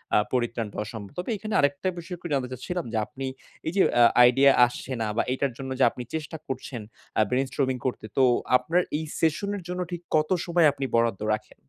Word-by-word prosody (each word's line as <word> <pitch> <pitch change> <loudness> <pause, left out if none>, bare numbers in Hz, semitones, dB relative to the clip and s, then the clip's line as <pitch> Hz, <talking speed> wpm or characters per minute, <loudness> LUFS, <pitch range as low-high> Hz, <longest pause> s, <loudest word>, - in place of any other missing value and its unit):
আ - - +6 0.2
পরিত্রাণ 120 -2 0
পাওয়া 105 - -4
সম্ভব। 105 -1 -8
তবে 180 - -4
এইখানে 215 +1 -5
আরেকটা 145 +5 +1
বিষয় 175 +1 -6
একটু 175 - -7
জানতে 135 -2 0
চাচ্ছিলাম 170 +7 -4
যে - - 0
আপনি 135 +4 -7 0.4
এই 160 - -1
যে 195 - +6 0.2
আ - - +9 0.3
idea 135 +2 +5
আসছে 120 +2 -6
না 110 - 0
বা - - +3
এইটার 135 +1 -1
জন্য 135 -1 -6
যে - - +5
আপনি 125 - -7
চেষ্টা 160 0 -4
করছেন 130 -3 -5 0.4
আ - - +6
brain-storming 130 +1 0
করতে, 125 -4 -2
তো 135 - +5 0.3
আপনার 175 +6 +1 0.2
এই 160 - -4
session 165 +5 +1
এর 190 - -9
জন্য 180 0 -3
ঠিক 175 -1 -4
কতো 155 +3 +2
সময় 170 -2 +4
আপনি 140 -1 -4
বরাদ্দ 115 -4 +2
রাখেন? 105 0 -5
135 Hz, 210 wpm, -26 LUFS, 125-165 Hz, 0.4 s, আ